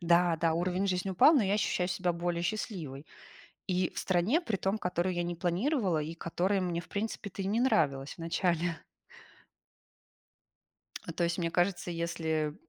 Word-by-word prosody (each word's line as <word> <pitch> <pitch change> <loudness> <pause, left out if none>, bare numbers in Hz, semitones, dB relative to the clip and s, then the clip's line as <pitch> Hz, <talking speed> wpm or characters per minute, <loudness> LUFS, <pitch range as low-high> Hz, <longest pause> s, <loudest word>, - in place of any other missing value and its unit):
Да-да, 170 -1 +3
уровень 180 +3 0
жизни 185 +1 -1
упал, 190 - +6
но 265 - +4
я 195 0 +1
ощущаю 185 -3 0
себя 180 -1 0
более 170 0 -2
счастливой. 170 - -4 0.6
И 185 -1 +1
в - - -4
стране, 190 - +2
при 225 - -2
том, 195 +2 0
которую 180 -2 -1
я 175 0 -1
не 175 0 -3
планировала 185 - +1
и 155 +2 -4
которая 185 +4 0
мне, 175 -2 -1
в - - -16
принципе-то 205 -1 -4
и 190 - -3
не 220 +4 +1
нравилась 140 - +1
вначале. 170 0 0 2.3
А 165 - -6
то 170 - 0
есть, 170 +1 -1
мне 170 -2 0
кажется, 175 +1 0
если, 160 -3 -1
175 Hz, 160 wpm, -31 LUFS, 170-195 Hz, 2.3 s, упал